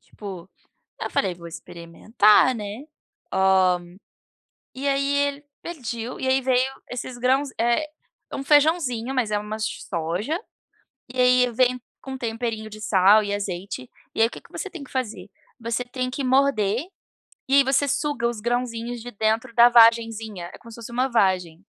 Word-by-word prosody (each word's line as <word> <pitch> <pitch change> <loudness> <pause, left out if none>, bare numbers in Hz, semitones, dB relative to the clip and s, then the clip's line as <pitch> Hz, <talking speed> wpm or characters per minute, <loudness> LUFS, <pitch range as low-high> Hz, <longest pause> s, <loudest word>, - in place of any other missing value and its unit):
Tipo, 190 -3 -10 0.5
eu - - -2
falei: 185 -3 0
"Vou 170 -1 -11
experimentar", 205 +9 +2
né, 210 +6 -7 0.5
hã. 190 0 +4 1.1
E 275 +2 -3
aí 275 0 +1 0.2
ele 285 +1 -6 0.2
pediu 245 -7 -5
e 260 - -2
aí 265 - +4
vieram 260 +1 0
esses 245 0 -6
grãos 265 +3 +2
é 240 +6 +1 0.4
um - - -3
feijãozinho, 285 -5 +2
mas 240 -5 0
é 210 - +2
uma 210 +1 -5
s 220 - -4
soja. 175 - -2 0.7
E 255 - -5
aí 250 0 +4
vem 250 +1 +1 0.2
com 265 - -8
um - - -5
temperinho 225 -2 -3
de 215 0 -11
sal 205 +2 +5
e 205 - -3
azeite. 190 -9 -5 0.3
E - - +1
aí, 225 - +6
o - - -10
que - - -10
que - - -21
você 390 - -5
tem 340 -6 -9
que 275 - -14
fazer? 245 -6 -4 0.3
Você 230 +1 -2
tem 255 +1 -4
que 270 +1 -4
morder 255 - +2 0.6
e 270 - +3
aí 280 - +7
você 275 +2 +2
suga 285 -3 0
os 235 -3 -4
grãozinhos 240 0 -2
de 245 - -7
dentro 220 +3 -1
da 235 0 +8
vagenzinha, 225 -5 +3
é - - -10
como 230 - -14
se - - -10
fosse 235 0 -9
uma 255 +3 0
vagem. 185 -6 +1
235 Hz, 175 wpm, -24 LUFS, 210-260 Hz, 1.1 s, da